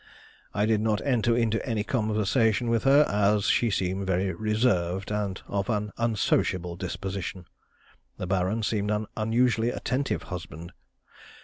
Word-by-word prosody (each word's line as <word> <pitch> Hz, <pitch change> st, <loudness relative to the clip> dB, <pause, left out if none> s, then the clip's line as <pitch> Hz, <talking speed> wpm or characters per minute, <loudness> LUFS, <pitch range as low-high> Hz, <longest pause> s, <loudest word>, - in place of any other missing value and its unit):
I 105 Hz, +1 st, +1 dB
did 110 Hz, -1 st, +2 dB
not 110 Hz, -1 st, +1 dB
enter 120 Hz, -3 st, +2 dB
into 115 Hz, -2 st, +1 dB
any 115 Hz, -5 st, -1 dB
conversation 110 Hz, +1 st, +1 dB
with 115 Hz, 0 st, +1 dB
her, 140 Hz, +2 st, +7 dB
as 105 Hz, 0 st, +2 dB
she 120 Hz, -, +3 dB
seemed 95 Hz, -1 st, -1 dB
very 95 Hz, +1 st, 0 dB
reserved 105 Hz, -4 st, 0 dB
and 105 Hz, -2 st, -2 dB
of 100 Hz, +1 st, -2 dB
an 105 Hz, -2 st, -1 dB
unsociable 95 Hz, -6 st, 0 dB
disposition. 95 Hz, 0 st, -5 dB, 0.7 s
The -, -, -4 dB
Baron 95 Hz, +4 st, 0 dB
seemed 105 Hz, -1 st, 0 dB
an 105 Hz, 0 st, 0 dB
unusually 115 Hz, +1 st, +2 dB
attentive 130 Hz, +3 st, -2 dB
husband. 85 Hz, 0 st, -7 dB
105 Hz, 135 wpm, -27 LUFS, 95-115 Hz, 0.7 s, her